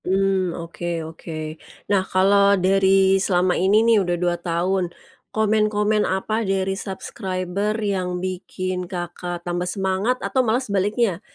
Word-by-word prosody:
Mmm, 190 -1 +1
oke 170 +1 -7 0.2
oke. 160 +1 -9 0.6
Nah, 195 - +4
kalo 200 +1 +4
dari 190 0 +4
selama 180 -1 +2
ini 205 +5 +3
nih 230 -1 +5
udah 175 -2 -1
2 175 0 +1
tahun, 175 +2 0 0.4
komen-komen 215 -1 +1
apa 215 +4 -1
dari 195 -2 0
subscriber 195 +1 -3
yang 190 -4 -1
bikin 185 0 -4
Kakak 175 -1 -5
tambah 175 0 -2
semangat 190 +6 0
atau 260 - +2
malah 230 -1 +2
sebaliknya, 200 -1 0
190 Hz, 125 wpm, -22 LUFS, 180-205 Hz, 0.6 s, nih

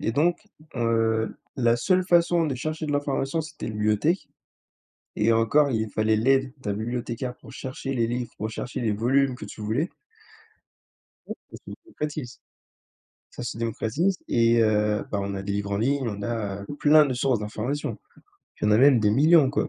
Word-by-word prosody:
et 115 - -1
donc, 170 +7 +2 0.4
heu, 115 -2 +1 0.2
la 120 -2 +3
seule 185 +8 +2
façon 170 -1 +3
de 140 - -1
chercher 155 +5 -4
de 145 - -2
l'information, 145 +2 -1
c'était 155 -2 -7
la 110 - -4
bibliothèque 105 - 0 0.9
et 110 +2 +2
encore, 115 +6 +3
il 110 -2 -1
fallait 110 +1 +1
l'aide 135 +3 +2
d'un 105 -6 -3
bibliothécaire 120 +3 -4
pour - - -14
chercher 135 +1 -5
les 115 -2 +1
livres, 120 0 -3
pour 110 - -3
chercher 120 +3 -5
les 115 -3 +1
volumes 130 +5 +2
que - - -8
tu 110 - -10
voulais. 120 - -1 1.4
Oui, - - -4 0.2
ça - - -9
se - - -24
démocratise. 150 - -6 0.9
Ça - - -8
se 120 - -4
démocratise 115 - -1
et 115 0 +3
heu, 105 -1 +1
bah, 100 - -1
on 100 0 -3
a 95 - -4
des 100 0 -3
livres 100 0 -2
en 100 - 0
ligne, 140 +6 +1
on 100 -2 -5
a, 100 -3 -3
heu, - - -10
plein 150 0 +6
de 130 - -2
sources 125 -1 +1
d'informations. 110 +3 -3 0.6
Il - - +1
y - - +3
en - - +3
a 105 - +5
même 135 -2 +6
des 105 -1 +3
millions, 150 +4 +5
quoi, 145 +2 -1
120 Hz, 190 wpm, -25 LUFS, 110-140 Hz, 1.4 s, plein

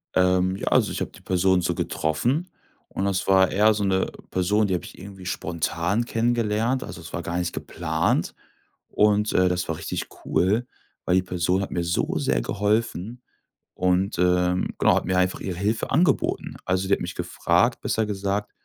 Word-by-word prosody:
Ähm, 90 0 +3
ja, - - -6
also, - - +3
ich - - -4
habe - - -3
die - - -16
Person 95 0 +2
so 85 0 -1
getroffen, 120 - -1 0.4
und 95 - -3
das 100 -1 -1
war 95 -1 +5
eher 105 +2 +4
so 105 -1 -2
'ne 95 -1 +1 0.2
Person, 100 +4 +2
die 95 - -1
habe 90 - -1
ich - - -12
irgendwie 95 0 -11
spontan 85 +5 -1
kennengelernt. 115 +1 0
Also, - - -8
es 80 - -11
war 85 - -2
gar 85 +1 -3
nicht 90 -1 -2
geplant. 80 -1 -1 0.6
Und, 105 0 +2
äh, 90 0 +4
das 90 0 -2
war - - -2
richtig - - -4 0.2
cool, 105 +7 +1 0.4
weil 90 - +1
die 95 - +3
Person 90 +1 0
hat 95 - -4
mir 85 - -1
so 85 0 -1
sehr - - 0
geholfen 105 - -1 0.5
und, 90 +1 +1
ähm, 90 0 +2
genau, - - +4
hat - - 0
mir 95 -1 0
einfach 90 0 +1
ihre 90 -3 -4
Hilfe 105 +4 -1
angeboten. 155 -2 +1
Also, 95 +1 0
sie 100 - +2
hat - - +1
mich 90 +1 -5
gefragt, 90 +5 +1
besser 110 - 0
gesagt, 100 0 -2
95 Hz, 185 wpm, -24 LUFS, 90-105 Hz, 0.6 s, war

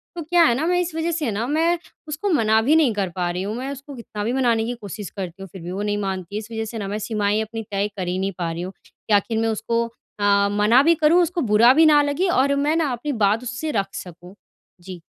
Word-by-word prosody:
तो 345 - -4
क्या 340 +2 +3
है 240 -7 +4
ना, 290 +6 -1
मैं 355 0 +2
इस 355 -1 -4
वजह 325 +1 -1
से 315 -6 -1
ना 215 +3 -2
मैं 325 +4 +2 0.3
उसको 305 +7 -3
मना 220 - +3
भी 280 +8 +3
नहीं 300 -8 +4
कर 200 -3 -1
पा 180 -1 -1
रही 180 +2 -3
हूँ। 205 +3 -3
मैं 260 +2 -4
उसको 280 +1 -9
कितना 220 -3 -6
भी 230 +4 -1
मनाने 235 -4 +2
की 240 - -2
कोशिश 205 -1 -7
करती 185 -2 -7
हूँ, 195 - -7
फिर 190 - -10
भी 175 +2 -6
वो 190 +2 -4
नहीं 205 0 -1
मानती। 195 -1 -4
इस 215 0 -6
वजह 225 -1 -3
से 225 +1 -7
ना 205 -2 -4
मैं 205 +2 -3
सीमाएँ 210 -1 0
अपनी 225 +1 -5
तय 200 0 0
कर 185 -2 -3
ही 180 +1 -1
नहीं 195 +1 -1
पा 170 -2 -2
रही 165 +1 -5
हूँ 185 +2 -6
कि 215 - -5
आखिर 205 +3 +2
मैं 225 0 +1
उसको 230 +2 -1 0.4
अ, 200 0 +3
मना 210 +5 +4
भी 335 +3 +5
करूँ, 325 +3 +4
उसको 345 +1 0
बुरा 220 +4 +6
भी 320 +3 +5
ना 300 -1 +6
लगे 290 +6 0
और 280 -3 +2
मैं 290 +3 +1
ना 320 -4 +1
अपनी 245 +5 -4
बात 210 +4 +2
उससे 255 +5 -4
रख 195 0 -4
सकूँ। 180 +1 -10 0.5
जी। 180 -1 -9
225 Hz, 270 wpm, -22 LUFS, 200-290 Hz, 0.5 s, बुरा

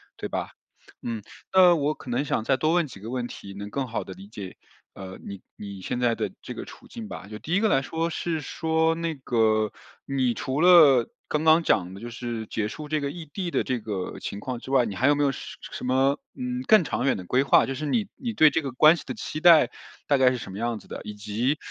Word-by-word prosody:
对 - - -6
吧？ - - -3 0.5
嗯， 115 -3 -4 0.3
那 185 -2 +7
我 150 0 0
可 125 - -9
能 130 +4 +1
想 115 - -1
再 135 +3 +2
多 155 +5 +1
问 175 -2 +3
几 115 -8 -11
个 110 +3 -8
问 125 -1 -2
题， 100 -4 -9
能 100 +1 -7
更 135 -2 -2
好 115 - -3
地 95 - -9
理 95 +2 -12
解， 100 -3 -8 0.4
呃， 95 -1 -9
你 100 -1 -7
你 100 -2 -8
现 125 - -3
在 120 -1 +2
的 - - -3
这 - - -6
个 - - -6
处 - - -14
境 225 -2 -8
吧。 100 - -8
就 105 0 -8
第 165 - -4
1 - - +4
个 220 - +3
来 135 - +3
说 165 +4 -2
是 165 -2 -2
说 160 +2 0
那 165 -1 -3
个， 110 -4 +1 0.3
你 130 -3 0
除 135 +4 -2
了 155 -9 +7 0.2
刚 150 +1 -1
刚 160 +1 +5
讲 95 - +1
的 - - -9
就 120 - -6
是 115 -2 -5
结 105 -1 -2
束 150 +7 -7
这 155 0 -1
个 140 - -1
异 165 +1 -8
地 175 +4 -4
的 - - 0
这 125 -2 -2
个 100 -4 -5
情 100 - -5
况 125 +1 -5
之 130 - -11
外， 130 -3 +4
你 105 - -4
还 130 - +2
有 145 - +5
没 145 - +1
有 140 - +3
什 - - -8
什 - - -6
么， 135 +2 +2 0.2
嗯， 250 0 -3
更 215 -5 +7
长 - - -2
远 135 - +2
的 90 - -7
规 125 +8 +2
划， 140 - +5
就 135 - -3
是 150 +3 -4
你 215 +5 0
你 235 -3 -4
对 155 -6 +6
这 165 - +1
个 135 -3 -4
关 155 +7 +6
系 - - -8
的 - - -4
期 155 - -5
待 170 -2 +7 0.4
大 140 - +4
概 130 -1 +5
是 125 - -2
什 100 - -8
么 100 - -7
样 120 -1 -1
子 - - -19
的？ - - -7
以 105 0 -7
及， 110 +8 -1
130 Hz, 275 characters per minute, -26 LUFS, 110-160 Hz, 0.5 s, 那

